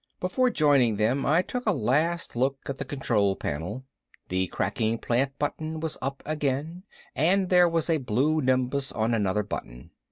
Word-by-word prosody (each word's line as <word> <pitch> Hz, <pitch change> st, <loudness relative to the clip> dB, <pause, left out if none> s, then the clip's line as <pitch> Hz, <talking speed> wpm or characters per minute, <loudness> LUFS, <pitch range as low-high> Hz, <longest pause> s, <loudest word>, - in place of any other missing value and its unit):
Before 250 Hz, +8 st, +1 dB
joining 140 Hz, -, +3 dB
them 115 Hz, +6 st, +1 dB
I 160 Hz, +5 st, +4 dB
took 250 Hz, +6 st, -4 dB
a -, -, +5 dB
last 155 Hz, +8 st, 0 dB
look 135 Hz, +3 st, +1 dB
at 140 Hz, -, -5 dB
the 135 Hz, -, -3 dB
control 110 Hz, -8 st, 0 dB
panel. 90 Hz, -, -4 dB, 0.5 s
The 95 Hz, 0 st, 0 dB
cracking 110 Hz, +5 st, -1 dB
plant 135 Hz, +4 st, -1 dB
button 155 Hz, +2 st, -3 dB
was 160 Hz, -1 st, -2 dB
up 135 Hz, +1 st, -4 dB
again 155 Hz, +4 st, -2 dB, 0.3 s
and 185 Hz, +5 st, +2 dB
there 180 Hz, -1 st, +5 dB
was 165 Hz, -1 st, 0 dB
a 165 Hz, -2 st, +2 dB
blue 140 Hz, +5 st, +1 dB
nimbus 130 Hz, +1 st, +1 dB
on 110 Hz, +1 st, 0 dB
another 105 Hz, -2 st, +1 dB
button. -, -, -7 dB
135 Hz, 165 wpm, -26 LUFS, 115-160 Hz, 0.5 s, a